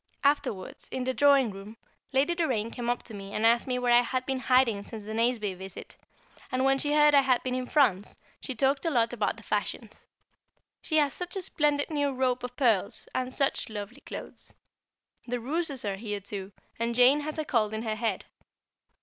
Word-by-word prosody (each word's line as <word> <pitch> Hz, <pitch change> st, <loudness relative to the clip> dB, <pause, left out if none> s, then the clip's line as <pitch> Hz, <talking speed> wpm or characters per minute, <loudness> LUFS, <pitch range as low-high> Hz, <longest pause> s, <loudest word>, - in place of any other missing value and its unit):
Afterwards, 280 Hz, -9 st, -1 dB
in 260 Hz, -, -3 dB
the 260 Hz, +1 st, -1 dB
drawing 280 Hz, -4 st, +4 dB
room, 200 Hz, +3 st, -10 dB, 0.3 s
Lady 275 Hz, +6 st, +2 dB
Doraine 250 Hz, -10 st, -1 dB
came 240 Hz, -1 st, -4 dB
up 245 Hz, -, -1 dB
to 225 Hz, -, -11 dB
me 200 Hz, -1 st, -8 dB
and 215 Hz, -, +1 dB
asked 235 Hz, +2 st, +4 dB
me 250 Hz, -1 st, 0 dB
where 245 Hz, -1 st, +2 dB
I 240 Hz, -, +7 dB
had 255 Hz, +1 st, -2 dB
been 265 Hz, -1 st, -1 dB
hiding 255 Hz, -5 st, +3 dB
since 215 Hz, -1 st, -9 dB
the 215 Hz, -, -5 dB
Nazeby 225 Hz, -3 st, +1 dB
visit, 190 Hz, +1 st, -10 dB, 0.6 s
and 255 Hz, +1 st, +1 dB
when 270 Hz, 0 st, +3 dB
she 290 Hz, +1 st, +1 dB
heard 295 Hz, 0 st, +6 dB
I 280 Hz, -, +7 dB
had 260 Hz, -2 st, +2 dB
been 255 Hz, -, -2 dB
in 255 Hz, 0 st, -2 dB
France, 220 Hz, -11 st, +2 dB, 0.2 s
she 260 Hz, -, -4 dB
talked 275 Hz, +3 st, +1 dB
a 330 Hz, -, +1 dB
lot 235 Hz, -5 st, +1 dB
about 220 Hz, -1 st, -1 dB
the 225 Hz, -, -13 dB
fashions. 215 Hz, +1 st, -4 dB, 0.7 s
She 315 Hz, -, 0 dB
has 290 Hz, -2 st, +3 dB
such 360 Hz, +1 st, -4 dB
a 385 Hz, -, -2 dB
splendid 295 Hz, -2 st, +1 dB
new 290 Hz, -2 st, +1 dB
rope 255 Hz, -1 st, +1 dB
of 250 Hz, 0 st, -6 dB
pearls, 220 Hz, -8 st, +1 dB
and 255 Hz, 0 st, -2 dB
such 275 Hz, -2 st, 0 dB
lovely 215 Hz, +5 st, -7 dB
clothes. -, -, -8 dB, 0.7 s
The 245 Hz, 0 st, -2 dB
Rooses 285 Hz, 0 st, -2 dB
are 195 Hz, -1 st, -2 dB
here 205 Hz, -1 st, -4 dB
too, 200 Hz, 0 st, -6 dB, 0.3 s
and 235 Hz, 0 st, -1 dB
Jane 250 Hz, +4 st, +6 dB
has 305 Hz, +1 st, -4 dB
a 310 Hz, -, -2 dB
cold 220 Hz, -6 st, +1 dB
in 220 Hz, +1 st, -4 dB
her 220 Hz, -2 st, -1 dB
head. 215 Hz, -3 st, -2 dB
250 Hz, 205 wpm, -28 LUFS, 220-275 Hz, 0.7 s, I